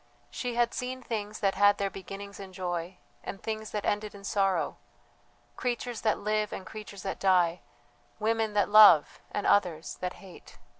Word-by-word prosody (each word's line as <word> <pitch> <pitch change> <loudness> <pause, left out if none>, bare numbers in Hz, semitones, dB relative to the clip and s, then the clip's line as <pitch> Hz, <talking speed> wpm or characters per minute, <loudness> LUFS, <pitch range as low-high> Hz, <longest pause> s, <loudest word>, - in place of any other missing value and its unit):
She 245 -2 -4
had 240 0 +2
seen 255 0 -4
things 215 -2 -4
that 195 -2 +2
had 205 0 +4
their 200 -1 -1
beginnings 200 +1 -8
in 190 -1 -9
joy, 175 -1 -4 0.3
and 195 - -6
things 220 0 -4
that 210 -1 -4
ended 210 0 -1
in 200 - -12
sorrow, 195 -3 0 0.8
creatures 245 -1 -3
that 215 - +2
live 215 0 -1
and 190 - -6
creatures 205 -3 -9
that 190 - -4
die, 180 -3 +3 0.6
women 220 0 0
that 205 -3 +3
love 205 -8 +7
and 205 - -3
others 175 -6 +1
that 180 0 -2
hate. 190 -3 -14
205 Hz, 165 wpm, -29 LUFS, 190-215 Hz, 0.8 s, love